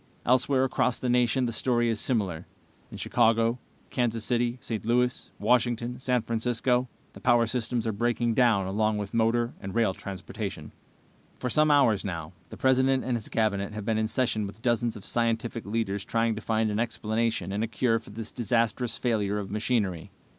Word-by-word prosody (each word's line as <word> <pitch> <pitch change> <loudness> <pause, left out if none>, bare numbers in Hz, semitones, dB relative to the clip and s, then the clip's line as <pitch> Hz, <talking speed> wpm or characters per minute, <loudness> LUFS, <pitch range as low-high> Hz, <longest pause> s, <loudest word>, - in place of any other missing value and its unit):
Elsewhere, 130 +2 +3
across 130 -2 +1
the 125 - -2
nation, 125 +1 +3
the 120 - -1
story 120 0 +1
is 115 -2 0
similar. 95 -9 -1 0.4
In - - -9
Chicago, 115 0 +2 0.3
Kansas 115 -3 0
City, 120 0 0
St. 110 -3 -4
Louis, 125 +2 +1
Washington, 120 0 +1
San 125 -3 +1
Francisco 125 +2 0 0.3
the - - -12
power 120 -2 +4
systems 120 0 -1
are 110 - +1
breaking 120 +2 0
down 115 -6 +3
along 105 +3 0
with 105 -1 -5
motor 115 +1 +1
and 95 -1 -7
rail 115 -5 +2
transportation. 95 0 -6 0.7
"For 125 - -3
some 155 0 +4
hours 130 -9 +4
now, 85 -3 -5 0.2
the - - -9
President 130 0 +3
and 125 -1 -1
his 110 -3 -5
Cabinet 105 -2 0
have 105 -1 -6
been 110 -1 +1
in 110 - +1
session 110 -3 0
with 100 +4 -12
dozens 120 -2 +1
of 100 - -12
scientific 115 -1 -1
leaders 100 -2 -1
trying 115 +1 +1
to 110 - -6
find 110 0 0
an 105 - -1
explanation 110 -3 -1
and 105 +2 -1
a - - 0
cure 115 +1 +1
for - - -15
this 110 +1 -7
disastrous 120 0 0
failure 105 -4 0
of 100 -2 -5
machinery. 105 -6 -1
115 Hz, 180 wpm, -27 LUFS, 110-125 Hz, 0.7 s, power